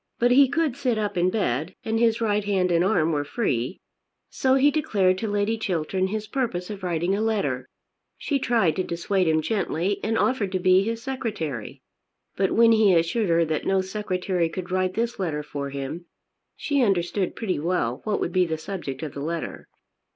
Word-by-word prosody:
But 245 +1 +3
he 270 +1 +6
could 310 -3 0
sit 255 -5 0
up 210 -1 -2
in 180 +1 +2
bed, 170 - -1
and 225 0 0
his 230 -1 +2
right 210 -2 +1
hand 190 -3 +1
and 170 0 +3
arm 175 -5 +2
were 145 -2 0
free. 145 - -2 0.5
So 260 0 +2
he 275 +2 +4
declared 195 -11 +1
to 225 - -2
Lady 205 +2 0
Chiltern 185 -1 -1
his 215 +2 -3
purpose 215 -7 -2
of 200 -2 -7
writing 175 0 0
a 205 - -1
letter. 145 - -1 0.5
She 285 -2 -1
tried 230 -10 +2
to 185 - +1
dissuade 180 +2 -1
him 155 -1 +2
gently 195 0 -1
and 225 +1 0
offered 225 -7 +1
to 185 - +1
be 185 +1 +5
his 225 +2 -3
secretary. 205 - -4 0.5
But 190 -1 +1
when 230 0 +5
he 215 -4 +5
assured 170 +5 +1
her 165 0 +3
that 155 -1 -2
no 195 0 +3
secretary 185 -3 -1
could 180 +1 -6
write 185 0 0
this 235 0 -2
letter 155 -5 -2
for 140 -1 -5
him 140 +5 -6 0.5
she 285 -2 0
understood 190 -3 0
pretty 195 -9 -2
well 145 -7 -1
what 215 -2 -1
would 170 - -2
be 185 -1 +3
the 160 -1 -2
subject 160 -5 -6
of 150 - -5
the 140 - -6
letter. 165 +2 -4
190 Hz, 195 wpm, -25 LUFS, 165-220 Hz, 0.5 s, he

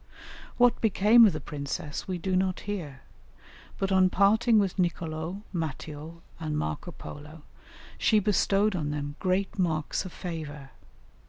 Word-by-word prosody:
What 245 0 +4
became 220 +2 +6
of 195 - +1
the 155 - -3
princess 145 0 -5
we 185 -1 -2
do 185 +2 -1
not 185 0 0
hear, 160 -10 -5 0.8
but 195 0 -1
on 185 -1 +5
parting 220 +5 +4
with 195 -2 +1
Nicolo, 170 +1 -2
Matteo, 160 0 -5 0.2
and 155 -2 -2
Marco 75 0 -3
Polo, 150 +1 -10 0.6
she 220 - +4
bestowed 205 0 +2
on 155 -4 -2
them 145 -1 -4
great 190 +2 -1
marks 160 -4 0
of 185 - -8
favour. 150 -7 -7
175 Hz, 140 wpm, -28 LUFS, 150-195 Hz, 0.8 s, became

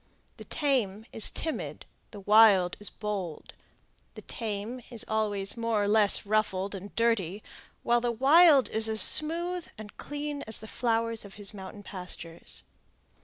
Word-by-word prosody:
The - - -11
tame 225 -8 -1
is 220 - +4
timid; 320 - -4 0.2
the 205 - -11
wild 205 -3 +5
is 205 - -3
bold. 200 -7 -6 0.6
The - - -10
tame 225 +2 -5
is 235 -3 0
always 205 -3 -1
more 230 -3 0
or - - 0
less 210 -1 +4
ruffled 200 -2 -1
and 200 +1 -9
dirty; 215 -4 0 0.4
while 240 0 +2
the 240 0 0
wild 280 +4 +5
is 220 0 +2
as 220 0 0
smooth 345 +3 +1
and 215 -1 -11
clean 290 0 -5
as 220 - 0
the 220 - -10
flowers 230 -1 -1
of 200 -1 -12
his 205 0 -6
mountain 200 +1 -10
pastures. 180 -4 -8
220 Hz, 150 wpm, -28 LUFS, 200-240 Hz, 0.6 s, wild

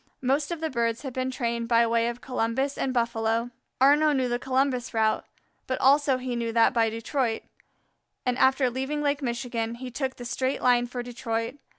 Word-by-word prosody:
Most 280 +3 +1
of 340 -2 -4
the 320 - -2
birds 230 -1 -1
had 265 -3 -5
been 255 0 -1
trained 235 -2 -2
by 230 0 +4
way 230 0 +2
of 240 +1 -4
Columbus 255 +3 -1
and 265 - -1
Buffalo. 230 -1 0 0.3
Arnaux 295 +3 +5
knew 260 -2 +1
the 240 0 -1
Columbus 260 -2 0
route, 220 -1 +2 0.4
but 260 - -2
also 275 0 +4
he 255 -1 -4
knew 230 -1 -2
that 230 +1 +4
by 230 -2 +3
Detroit, 230 +1 -2 0.8
and 250 -1 +1
after 265 -1 +3
leaving 265 +4 -2
Lake 285 0 0
Michigan, 235 -2 -2
he 250 +1 -7
took 260 +1 -3
the 245 - -9
straight 260 +2 -2
line 245 -1 +4
for 245 0 -5
Detroit. 235 +1 -4
245 Hz, 190 wpm, -26 LUFS, 235-265 Hz, 0.8 s, Arnaux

